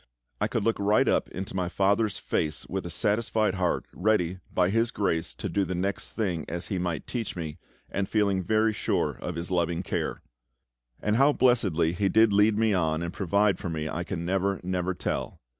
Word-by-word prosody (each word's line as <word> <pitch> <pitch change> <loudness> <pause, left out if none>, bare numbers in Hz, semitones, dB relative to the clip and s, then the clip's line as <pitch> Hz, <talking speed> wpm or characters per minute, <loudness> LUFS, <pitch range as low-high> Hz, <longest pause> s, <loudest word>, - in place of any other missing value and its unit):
I - - +1
could - - -1
look 115 -1 +1
right 105 +2 +3
up - - +2
into 95 +1 -6
my 90 -2 -1
FATHER'S 100 +3 +1
face 75 -1 -1
with - - -3
a - - -5
satisfied 110 -1 +1
heart, 90 -2 0
ready, 95 -3 +1
by 90 0 +2
His 115 +2 +2
grace, 85 -7 -1
to - - -4
do 100 - 0
the 95 0 -3
next 95 +3 -2
thing 90 -8 -1
as 85 +1 -4
He 95 -4 -1
might 85 -3 -2
teach 115 -4 -4
me, 80 -4 -5 0.3
and 95 -1 -2
feeling 100 -3 +2
very 110 +3 +2
sure - - -1
of 90 - -4
His 85 +2 -4
loving 85 0 0
care. - - -3 0.8
And 105 +1 +2
how 140 +3 +5
blessedly 100 - +3
He 95 +2 +1
did 110 0 +4
lead 105 +1 +4
me 110 -1 +3
on 80 -3 +1
and 85 +1 -4
provide 100 +1 +2
for 85 - -4
me 80 -1 -3
I 85 +3 -3
can 85 -2 -4
never, 95 +1 0
never 90 0 -1
tell. - - -3
95 Hz, 200 wpm, -27 LUFS, 85-105 Hz, 0.8 s, how